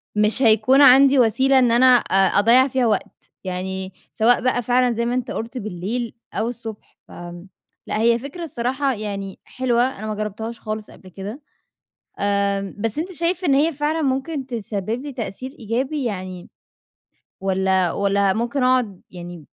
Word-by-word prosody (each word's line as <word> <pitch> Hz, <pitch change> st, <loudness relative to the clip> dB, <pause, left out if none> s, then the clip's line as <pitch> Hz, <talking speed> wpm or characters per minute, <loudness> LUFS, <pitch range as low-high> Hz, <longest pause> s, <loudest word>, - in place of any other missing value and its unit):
مش 210 Hz, +4 st, +2 dB
هيكون 230 Hz, +3 st, +5 dB
عندي 275 Hz, 0 st, +7 dB
وسيلة 260 Hz, +3 st, +4 dB
إن 245 Hz, -2 st, +3 dB
أنا 240 Hz, +2 st, +4 dB
أ 195 Hz, -4 st, +2 dB
أضيَّع 240 Hz, +5 st, +5 dB
فيها 260 Hz, -2 st, 0 dB
وقت، 215 Hz, -, -3 dB
يعني 190 Hz, 0 st, -4 dB, 0.2 s
سواء 235 Hz, +2 st, +3 dB
بقى 255 Hz, -1 st, +1 dB
فعلًا 250 Hz, +1 st, +2 dB
زي 235 Hz, 0 st, -1 dB
ما 240 Hz, -, -1 dB
أنت 250 Hz, -1 st, -2 dB
قُلت 230 Hz, +3 st, -5 dB
بالليل 215 Hz, +3 st, -4 dB, 0.2 s
أو 225 Hz, -, -1 dB
الصبح، 225 Hz, -3 st, -9 dB
ف -, -, -18 dB, 0.8 s
لأ، -, -, -2 dB
هي 235 Hz, +1 st, +3 dB
فكرة 280 Hz, +7 st, -7 dB
الصراحة 265 Hz, -1 st, -1 dB
يعني 200 Hz, -3 st, -6 dB
حلوة، 245 Hz, -2 st, 0 dB, 0.2 s
أنا 215 Hz, -, -5 dB
ما 215 Hz, -, -3 dB
جرَّبتهاش 215 Hz, +2 st, -5 dB
خالص 215 Hz, -1 st, -6 dB
قبل 185 Hz, -, -15 dB
كده. 200 Hz, -, -8 dB, 0.8 s
آآ 200 Hz, -1 st, 0 dB
بس 225 Hz, +4 st, -2 dB
أنت 350 Hz, +4 st, -3 dB
شايف 345 Hz, +2 st, -1 dB
إن 285 Hz, -5 st, +3 dB
هي 305 Hz, +4 st, +3 dB
فعلًا 300 Hz, +2 st, -1 dB
ممكن 270 Hz, +1 st, -2 dB
تسبِّب 225 Hz, -1 st, -4 dB
لي 290 Hz, 0 st, -6 dB
تأثير 255 Hz, +1 st, -6 dB
إيجابي 260 Hz, +6 st, -2 dB
يعني 185 Hz, -5 st, -5 dB, 0.9 s
والّا 190 Hz, -2 st, +1 dB
والّا 200 Hz, -1 st, +1 dB
ممكن 235 Hz, +6 st, -1 dB
أقعد 250 Hz, -7 st, +1 dB
يعني 175 Hz, -3 st, -9 dB
230 Hz, 160 wpm, -21 LUFS, 200-260 Hz, 0.9 s, عندي